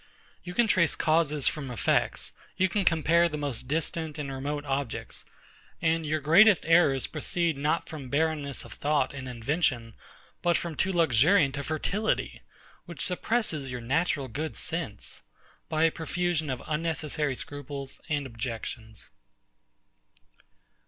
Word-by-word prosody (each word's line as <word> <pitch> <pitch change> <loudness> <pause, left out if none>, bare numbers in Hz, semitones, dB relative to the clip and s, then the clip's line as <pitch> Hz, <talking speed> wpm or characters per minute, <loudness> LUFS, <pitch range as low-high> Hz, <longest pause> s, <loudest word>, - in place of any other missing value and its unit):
You 180 0 -8
can 240 - +4
trace 185 -7 +3
causes 155 -3 +2
from 145 -4 -1
effects: 120 - 0 0.3
You 190 - +4
can 200 +1 0
compare 170 +1 +4
the 150 - -4
most 140 -5 -3
distant 160 +1 -1
and 145 -2 -4
remote 145 +2 -4
objects: 135 -3 -3 0.5
and 165 -1 +1
your 155 +1 0
greatest 180 +8 +6
errors 160 -6 +4
proceed 165 +1 -1
not 150 +4 0
from 145 -5 -8
barrenness 145 -2 0
of 115 - -10
thought 145 -2 0
and 130 -2 -6
invention, 120 -1 0 0.5
but 175 -1 +3
from 170 -2 -4
too 190 +5 0
luxuriant 155 - +4
a - - -3
fertility, 195 +8 -1 0.4
which 170 - -2
suppresses 180 - -1
your 125 -1 -4
natural 140 +3 0
good 150 +6 -4
sense, 155 -11 -4 0.5
by 155 0 +1
a 165 - +5
profusion 165 -1 -1
of 130 -2 -3
unnecessary 155 -3 -1
scruples 140 0 -7
and 145 -2 0
objections. 115 -2 -6
150 Hz, 135 wpm, -28 LUFS, 135-165 Hz, 0.5 s, greatest